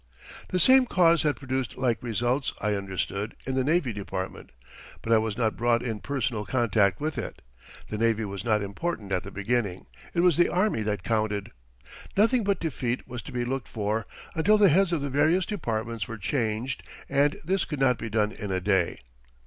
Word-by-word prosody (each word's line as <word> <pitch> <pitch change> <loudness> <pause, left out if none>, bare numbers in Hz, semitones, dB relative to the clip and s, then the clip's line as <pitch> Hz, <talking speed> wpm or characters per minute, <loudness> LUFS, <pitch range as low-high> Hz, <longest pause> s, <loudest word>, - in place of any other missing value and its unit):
The 185 - 0
same 260 +7 +6
cause 170 -5 +4
had 150 -2 +1
produced 130 -2 -3
like 125 -3 0
results, 120 +3 -1
I 105 0 0
understood, 100 +2 -3
in 130 - -2
the 130 0 +1
Navy 150 -4 +1
Department, 95 -2 -5 0.5
but 115 - +2
I 110 - +6
was 110 -1 -2
not 110 -3 +1
brought 120 0 +2
in 115 -4 -3
personal 125 -5 -2
contact 105 -5 +2
with 155 0 -2
it. - - -6 0.5
The 105 - -4
navy 115 -1 +2
was 100 -1 -5
not 105 -3 +2
important 100 - -4
at 90 - +1
the 95 - -8
beginning; 100 -2 -1 0.3
it 170 - +3
was 175 -4 +4
the 175 - +4
army 185 - +1
that 105 -3 -2
counted. 110 -3 -1 0.7
Nothing 230 +3 +4
but 200 -1 +1
defeat 130 -6 -2
was 125 -1 -6
to - - -10
be 120 -1 -2
looked 130 +1 -3
for 110 0 -2 0.3
until 190 +7 +4
the 205 -2 +6
heads 180 +3 +4
of 165 -4 0
the 140 - -2
various 155 +6 +3
departments 115 - -3
were 115 - -6
changed, 115 +2 -1 0.3
and 145 +1 +2
this 190 +3 +1
could 150 -4 -5
not 130 -3 +3
be 115 - -4
done 105 -1 +1
in 105 - -6
a 95 - +1
day. 95 -2 +1
120 Hz, 195 wpm, -27 LUFS, 105-150 Hz, 0.7 s, same